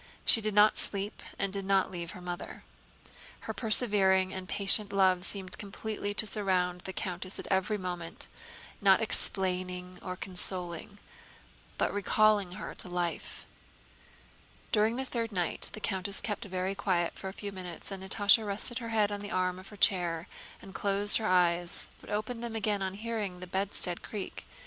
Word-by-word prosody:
She 225 - +9
did 215 -1 -2
not 210 +1 +5
sleep 200 +1 -2 0.2
and 195 -1 -2
did 200 -1 -1
not 195 0 +1
leave 170 -2 -6
her 180 - -10
mother. 175 0 -7 0.8
Her - - -5
persevering 195 -5 +2
and 185 -1 -7
patient 200 +1 +4
love 190 -2 +3
seemed 190 -1 -2
completely 205 0 -5
to 220 - +2
surround 185 -4 -1
the 190 - -6
countess 185 0 -5
every 190 +3 +1
moment, 175 -3 -2 0.6
not 195 -2 +5
explaining 180 -3 +4
or 185 - -5
consoling, 180 0 -4 0.8
but - - 0
recalling 205 -1 +2
her 210 - -7
to - - -4
life. 175 -2 -4 1.3
During 220 +2 +2
the 265 +1 -3
third 230 -3 -3
night 180 -4 -1
the - - -7
countess 200 -1 0
kept 210 -2 -3
very 185 0 -2
quiet 180 -3 0
for 195 - -8
a - - -4
few 205 0 -6
minutes, 180 -1 -5
and 195 -1 -6
Natásha 200 +3 +4
rested 210 +4 +2
her 230 -2 -6
head 215 -2 +1
on 205 - -3
the 205 0 -7
arm 185 -1 -1
of 190 - -12
her 210 - -13
chair 175 -3 +2 0.4
and 195 - -11
closed 200 +1 +2
her 220 - -2
eyes, 175 -1 +2
but - - -15
opened 215 +3 -3
them 235 -1 -5
again 210 -2 0
on 190 0 -3
hearing 210 -4 -4
the 180 - -7
bedstead 185 -1 -1
creak. 205 -3 -7
195 Hz, 170 wpm, -30 LUFS, 180-210 Hz, 1.3 s, She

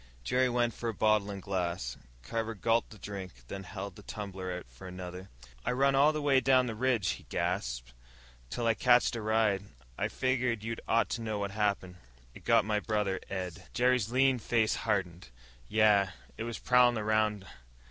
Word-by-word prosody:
Jerry 125 - +2
went 120 -1 +1
for 115 +2 -3
a 115 - -4
bottle 105 -1 +2
and 100 -2 -6
glass. 85 -10 -2 0.3
Carver 115 - -3
gulped 115 +3 +1
the 110 - -12
drink, 100 -4 -7 0.2
then 100 - -5
held 100 -1 -6
the - - -12
tumbler 95 -3 -6
out 90 0 -5
for - - -12
another. 90 +1 -8 0.3
"I - - 0
run 135 +2 +3
all 140 +3 +5
the 155 -1 -3
way 140 -2 +5
down 130 0 +4
the 115 - -3
ridge," 120 -4 +1
he - - -5
gasped, - - -2 0.6
"till 120 - -3
I 115 - +4
catched 120 +1 +4
a 115 - -3
ride. 110 -2 +2 0.4
I - - +1
figgered 125 -4 0
you 115 +1 -2
ought 115 +1 +2
to 120 - -3
know 110 -2 -2
what 100 -1 -2
happened. 100 -3 -1 0.4
It - - -14
got 115 -2 +4
my 105 -1 +1
brother 105 -3 -1
Ed." 90 -3 -5
Jerry's 125 -3 +2
lean 130 0 +3
face 110 0 +1
hardened. 90 - -2 0.4
"Yeah. 105 -3 +4 0.2
It 115 - -4
was 120 -1 -4
prowlin' 125 -1 +4
around. 105 -2 +1
110 Hz, 185 wpm, -31 LUFS, 95-120 Hz, 0.6 s, all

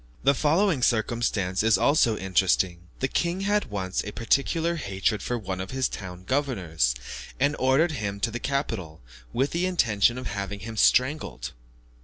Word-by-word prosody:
The 140 - +5
following 160 +2 +2
circumstance 110 -5 +1
is 110 -2 +4
also 120 -3 +3
interesting; 90 -2 +1
the 130 - +2
king 175 +6 -1
had 205 +1 +1
once 95 -3 -3
a 105 - -6
particular 160 +9 0
hatred 100 - -1
for 125 - -2
one 95 -4 -4
of 95 - -6
his 130 -1 0
town 90 -2 -8
governors, 95 - 0 0.4
and 140 +3 +2
ordered 135 +6 +3
him 100 -8 -3
to 115 - +1
the 120 - -4
capital, 115 - -3 0.3
with 135 +3 0
the 175 +2 0
intention 120 - +2
of 130 - -6
having 100 -1 -4
him 115 +2 -7
strangled. 125 - +2
115 Hz, 160 wpm, -26 LUFS, 95-140 Hz, 0.4 s, The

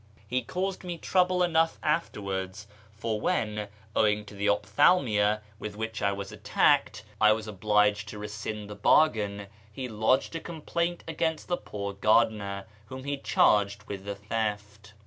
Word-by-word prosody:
He 125 +4 0
caused 190 +5 -3
me 175 -2 -4
trouble 180 +1 +2
enough 165 -1 +2
afterwards; 100 - -2 0.3
for 110 0 -3
when, 105 -1 -1 0.3
owing 105 -1 +2
to 105 - -12
the 100 +1 0
ophthalmia 105 - +3 0.2
with 105 -1 -6
which 110 0 -4
I 100 - +2
was 100 0 -5
attacked, - - +2 0.2
I 110 0 +7
was 110 0 -4
obliged 105 0 +2
to 105 - -7
rescind 105 0 -5
the 105 - -7
bargain, 105 -4 +3 0.3
he 130 +4 -5
lodged 115 +7 +1
a - - -1
complaint 170 +1 -3
against 160 0 -2
the 175 - +2
poor 100 -1 -5
gardener, 100 -1 +2 0.2
w^hom 130 0 -7
he 145 0 -1
charged 100 -6 +2
with 100 -1 -7
the 100 0 -4
theft. 105 0 -4
105 Hz, 150 wpm, -28 LUFS, 105-135 Hz, 0.3 s, I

